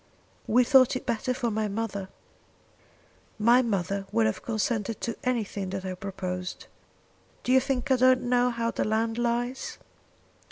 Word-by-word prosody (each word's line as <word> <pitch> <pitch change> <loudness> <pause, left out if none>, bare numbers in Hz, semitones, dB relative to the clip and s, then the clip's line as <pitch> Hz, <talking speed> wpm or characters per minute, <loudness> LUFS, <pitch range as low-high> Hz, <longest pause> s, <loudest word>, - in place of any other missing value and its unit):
"We 245 +3 +5
thought 255 0 +5
it 255 - -4
better 235 +3 -1
for 245 -2 -1
my 215 0 -1
mother." 200 -2 -4 1.3
"My 235 +4 +5
mother 195 -3 -2
would 115 - +2
have 110 - -1
consented 225 -1 -2
to 230 - -2
anything 215 -6 -2
that 190 0 -4
I 185 - -3
proposed. 185 -1 -5 0.8
Do 250 - 0
you 260 - +7
think 265 0 -2
I 260 - +5
don't 255 0 +4
know 245 0 +2
how 230 -1 -1
the - - -1
land 225 +2 0
lies? 240 +2 -2
230 Hz, 155 wpm, -27 LUFS, 200-250 Hz, 1.3 s, you